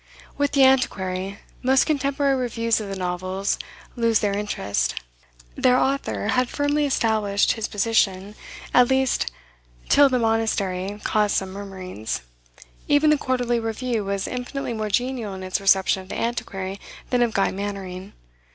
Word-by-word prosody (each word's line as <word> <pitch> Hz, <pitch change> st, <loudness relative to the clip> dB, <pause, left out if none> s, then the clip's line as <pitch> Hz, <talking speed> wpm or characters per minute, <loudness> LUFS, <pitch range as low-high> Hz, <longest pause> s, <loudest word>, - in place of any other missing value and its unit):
With 285 Hz, 0 st, 0 dB
"The 275 Hz, -1 st, +5 dB
Antiquary" 195 Hz, -7 st, +1 dB, 0.2 s
most 265 Hz, +1 st, +4 dB
contemporary 280 Hz, -2 st, +1 dB
reviews 230 Hz, -3 st, 0 dB
of 205 Hz, -, -6 dB
the 195 Hz, -, -4 dB
novels 185 Hz, +1 st, -2 dB, 0.4 s
lose 230 Hz, -2 st, +3 dB
their 200 Hz, -1 st, 0 dB
interest. 205 Hz, -, -1 dB, 0.6 s
Their 250 Hz, 0 st, +3 dB
author 275 Hz, +2 st, 0 dB
had 250 Hz, -1 st, +2 dB
firmly 290 Hz, 0 st, +1 dB
established 215 Hz, -6 st, +2 dB
his 225 Hz, -, -2 dB
position, 205 Hz, -2 st, +1 dB, 0.4 s
at 250 Hz, 0 st, +6 dB
least 265 Hz, -, +1 dB, 0.6 s
till 285 Hz, -1 st, +6 dB
"The 255 Hz, -, +1 dB
Monastery" 205 Hz, -4 st, 0 dB
caused 210 Hz, -1 st, +1 dB
some 190 Hz, -1 st, -1 dB
murmurings. 185 Hz, -, -5 dB, 0.7 s
Even 295 Hz, +1 st, +4 dB
the 300 Hz, -, +4 dB
"Quarterly 245 Hz, -3 st, 0 dB
Review" 225 Hz, 0 st, -2 dB
was 200 Hz, 0 st, -2 dB
infinitely 250 Hz, 0 st, -4 dB
more 215 Hz, -1 st, -3 dB
genial 240 Hz, -2 st, -1 dB
in 190 Hz, -, -7 dB
its 185 Hz, +1 st, -2 dB
reception 195 Hz, -1 st, +3 dB
of 185 Hz, -, -15 dB
"The -, -, -4 dB
Antiquary" 195 Hz, -5 st, -3 dB, 0.3 s
than 250 Hz, -1 st, +2 dB
of 235 Hz, -2 st, +1 dB
"Guy 195 Hz, -, +2 dB
Mannering." 195 Hz, -1 st, -6 dB
220 Hz, 145 wpm, -23 LUFS, 195-255 Hz, 0.7 s, at